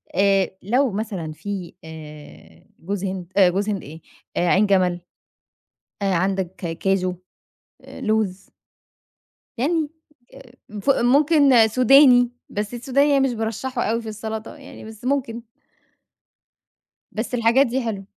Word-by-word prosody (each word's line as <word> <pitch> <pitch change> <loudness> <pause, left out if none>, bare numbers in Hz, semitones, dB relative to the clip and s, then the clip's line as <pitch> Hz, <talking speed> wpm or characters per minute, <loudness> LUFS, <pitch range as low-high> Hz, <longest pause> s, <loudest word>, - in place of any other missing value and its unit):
آآ، 195 -1 +3
لو 245 +5 +1
مثلًا 195 -6 -4
في 190 +1 -6
آآ، 150 - -12 0.2
جوز 195 +3 -4
هند 185 -2 -5
آآ، 185 -3 +6
جوز 200 +4 -1
هند 200 -3 -3
إيه، 160 +3 -11 0.4
عين 185 +4 +3
جَمل. 185 -3 +1 1.0
آآ، 195 -1 +1
عندك 190 0 -1
كاچو، 185 +2 -1 0.8
لوز. 215 -4 -2 1.1
يعني 310 +4 0 0.4
آآ، 250 -2 -15 0.3
ف - - -2
ممكن 275 -2 +4
سوداني، 250 +1 +5 0.2
بس 210 +3 -4
السوداني 275 +4 +1
يعني 275 -1 +3
مش 245 - -3
بارَشَّحه 235 +3 -3
أوي 230 +2 -1
في 225 - -7
السلطة 220 +3 -6
يعني 275 -6 -12
بس 220 +2 -12
ممكن. 250 -4 -1 1.7
بس 225 +3 -5
الحاجات 240 +3 +3
دي 255 +3 -1
حلوه. 205 -4 -4
215 Hz, 120 wpm, -22 LUFS, 190-250 Hz, 1.7 s, آآ